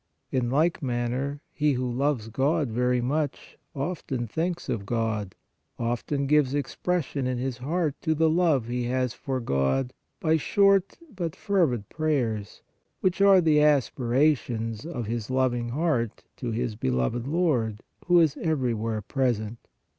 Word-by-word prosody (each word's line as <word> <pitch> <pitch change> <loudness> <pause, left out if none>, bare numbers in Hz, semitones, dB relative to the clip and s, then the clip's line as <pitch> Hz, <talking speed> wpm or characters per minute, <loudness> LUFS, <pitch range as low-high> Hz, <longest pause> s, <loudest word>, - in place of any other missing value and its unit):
In 125 -2 0
like 160 +6 +2
manner, 130 +2 -2
he 150 -1 +1
who 125 0 -1
loves 125 -2 -1
God 140 +5 +1
very 125 +2 +1
much, 145 +3 -2 0.2
often 135 -4 -3
thinks 170 +9 -2
of 105 - -2
God, 110 -4 -1 0.4
often 120 +4 -1
gives 145 -1 +3
expression 145 -1 -1
in 130 -1 -1
his 125 0 -3
heart 155 +3 0
to 160 -2 +1
the 160 +1 +3
love 160 -6 +3
he 120 0 -2
has 125 0 0
for 130 -2 -3
God 115 - 0 0.3
by 160 -1 +3
short, 195 +3 +3 0.2
but 170 -4 -3
fervid, 150 - +1
prayers, 125 -10 -2 0.4
which 185 0 +1
are 195 -2 +7
the 155 -3 +4
aspirations 130 -4 +1
of 125 -9 -4
his 115 0 -3
loving 125 -2 +1
heart 125 -5 -1
to 125 - -4
his 115 0 -2
beloved 65 - -1
Lord, 135 - 0 0.2
who 175 -1 +6
is 160 -4 +3
everywhere 115 -8 -1
present. 115 -3 -1
130 Hz, 140 wpm, -26 LUFS, 120-155 Hz, 0.4 s, are